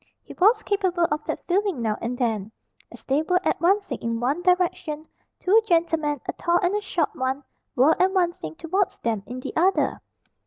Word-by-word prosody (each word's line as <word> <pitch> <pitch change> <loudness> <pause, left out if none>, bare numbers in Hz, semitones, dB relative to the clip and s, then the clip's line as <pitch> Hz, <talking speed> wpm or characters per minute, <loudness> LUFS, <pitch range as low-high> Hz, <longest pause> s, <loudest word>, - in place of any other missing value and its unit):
He - - -11
was 425 +6 +4
capable 375 -4 +1
of 300 0 -1
that - - -4
feeling 385 -4 0
now 220 -2 0
and 245 +2 -3
then. 220 -4 -1 0.4
As - - -12
they 275 +3 +1
were 360 +3 +1
advancing 365 - +1
in 230 0 -2
one 275 +8 0
direction, 350 -4 0 0.3
two 420 +5 +4
gentlemen, 325 -5 +1
a - - -2
tall 345 0 +1
and 355 +3 +2
a 420 - 0
short 345 -6 -1
one, 265 +2 -2 0.3
were 275 +6 +5
advancing 350 - +1
towards 370 - -1
them 225 -3 -2
in 250 +2 -6
the - - -6
other. 375 +4 +2
330 Hz, 180 wpm, -24 LUFS, 260-370 Hz, 0.4 s, were